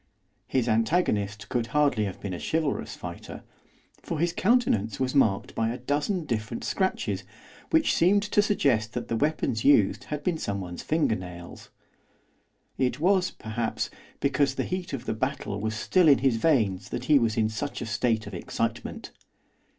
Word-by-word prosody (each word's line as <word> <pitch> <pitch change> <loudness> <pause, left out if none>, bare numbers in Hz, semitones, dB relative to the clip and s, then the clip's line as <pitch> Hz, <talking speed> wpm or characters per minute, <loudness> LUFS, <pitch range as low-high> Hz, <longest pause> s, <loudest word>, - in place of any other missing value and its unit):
His 125 -3 0
antagonist 110 - +1
could 120 -2 -1
hardly 140 -8 +3
have 95 - -6
been 100 -2 -5
a 85 - -5
chivalrous 155 -3 -1
fighter, - - -8 0.6
for 165 - -4
his 170 +2 +1
countenance 185 - +2
was 130 -1 0
marked 110 -9 +2
by 115 0 0
a 120 - -3
dozen 145 +8 -1
different 115 -3 -3
scratches 190 -1 -1 0.5
which 320 -1 +3
seemed 200 +4 +4
to 210 0 +3
suggest 125 - +1
that 120 - -4
the 115 - 0
weapons 145 -4 0
used 115 -3 +4
had 150 -1 -5
been 175 -3 0
someone's 95 -3 -4
finger 155 -8 +1
nails. 90 -2 -9 1.1
It 130 0 +1
was, 185 +2 +3
perhaps, 110 +1 -3 0.3
because 140 -1 +1
the - - -1
heat 185 0 -4
of 135 -4 -5
the - - -1
battle 110 -4 -3
was 110 +1 -2
still 175 - +3
in 140 - +7
his 130 -3 +2
veins 110 - +1
that 120 - -4
he 145 0 +5
was 115 -2 0
in 110 -1 +3
such 110 +6 -4
a - - -4
state 115 0 0
of 100 - -9
excitement. 85 - -4
125 Hz, 165 wpm, -27 LUFS, 110-155 Hz, 1.1 s, in